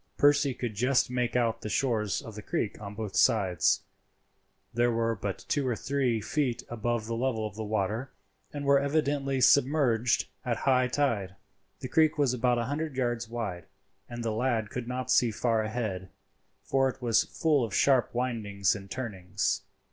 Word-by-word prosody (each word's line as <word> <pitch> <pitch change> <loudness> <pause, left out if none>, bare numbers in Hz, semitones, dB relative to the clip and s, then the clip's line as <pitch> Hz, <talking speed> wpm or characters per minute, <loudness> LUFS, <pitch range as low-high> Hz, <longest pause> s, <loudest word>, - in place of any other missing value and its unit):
Percy 145 -2 +4
could 120 -3 -4
just 125 +4 +2
make 125 -1 -1
out 115 -2 +1
the 105 - -5
shores 110 -3 0
of 115 -4 -9
the 105 - -8
creek 105 +1 -3
on 100 0 -7
both 110 -2 -5
sides; 95 -7 +3 0.9
they 120 +1 +2
were 115 -1 0
but 100 -1 -5
two 140 -3 0
or 120 - 0
three 130 -3 0
feet 125 +2 -1
above 120 -1 -2
the 115 - -4
level 115 -2 -1
of 105 - -5
the 110 - -4
water, 110 +4 -2 0.4
and 145 -1 -5
were 140 0 +5
evidently 140 -2 0
submerged 130 -2 +3 0.2
at 120 -3 -1
high 130 -2 +4
tide. 115 -9 -1 0.5
The - - -4
creek 155 +3 +3
was 140 -4 +2
about 125 0 +1
a 120 - 0
hundred 150 +1 -3
yards 120 -3 -1
wide, 110 -7 -4 0.4
and 120 -1 -6
the 115 - -1
lad 110 -2 0
could 125 -1 -5
not 125 0 -3
see 120 - +4
far 115 0 0
ahead, 110 -5 -3 0.5
for 135 0 +2
it 130 - -8
was 120 -3 +2
full 150 -5 +1
of 115 - -3
sharp 130 -3 +4
windings 105 -6 0
and 100 -1 -8
turnings. 100 -8 -2
120 Hz, 175 wpm, -29 LUFS, 110-130 Hz, 0.9 s, were